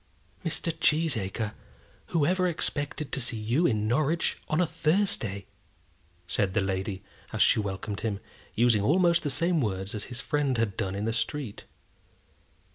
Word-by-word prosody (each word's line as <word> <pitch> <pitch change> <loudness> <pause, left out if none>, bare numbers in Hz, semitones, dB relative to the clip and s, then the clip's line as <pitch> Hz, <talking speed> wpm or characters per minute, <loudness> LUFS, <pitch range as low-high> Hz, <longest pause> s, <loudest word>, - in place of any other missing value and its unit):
"Mr. 165 0 0
Cheesacre, 115 -10 +1 0.5
whoever 180 +4 +2
expected 150 -3 -2
to 135 - +1
see 120 -1 +3
you 120 +11 +2
in 110 -3 0
Norwich 150 +7 +1
on 155 - +1
a 180 - +4
Thursday?" 155 - 0 0.8
said 95 -2 0
the - - +4
lady, 95 +1 -2 0.3
as - - +3
she - - +5
welcomed 100 0 -3
him, 105 -2 -2 0.4
using 115 -2 +4
almost 170 - +4
the 150 - -2
same 165 +4 +1
words 95 -3 -2
as 105 -2 -4
his 125 -1 -7
friend 135 +1 0
had 110 -4 0
done 95 0 -2
in 100 +2 -2
the 115 - 0
street. 120 -1 -3
120 Hz, 150 wpm, -28 LUFS, 105-155 Hz, 0.8 s, she